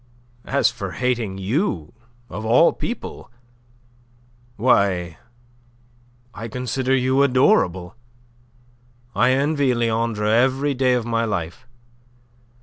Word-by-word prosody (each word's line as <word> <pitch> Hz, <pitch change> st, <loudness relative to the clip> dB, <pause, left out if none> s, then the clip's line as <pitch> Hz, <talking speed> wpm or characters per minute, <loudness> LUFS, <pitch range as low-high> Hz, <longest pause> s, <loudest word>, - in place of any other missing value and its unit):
"As -, -, +2 dB
for -, -, -6 dB
hating 120 Hz, -6 st, -2 dB
you, 95 Hz, -, -2 dB, 0.3 s
of 105 Hz, +5 st, -7 dB
all 120 Hz, +9 st, +4 dB
people! 240 Hz, -, -6 dB, 1.3 s
Why... 95 Hz, -, +1 dB, 1.1 s
I 115 Hz, +2 st, -7 dB
consider 125 Hz, +2 st, -1 dB
you 130 Hz, +1 st, +2 dB
adorable. 125 Hz, -, +2 dB, 1.2 s
I 125 Hz, -, +3 dB
envy 140 Hz, -1 st, +1 dB
Leandre 115 Hz, -2 st, -1 dB
every 130 Hz, +6 st, +2 dB
day 130 Hz, -1 st, +2 dB
of 120 Hz, -2 st, -2 dB
my 115 Hz, -1 st, 0 dB
life. 100 Hz, +4 st, -4 dB
120 Hz, 95 wpm, -21 LUFS, 105-130 Hz, 1.3 s, all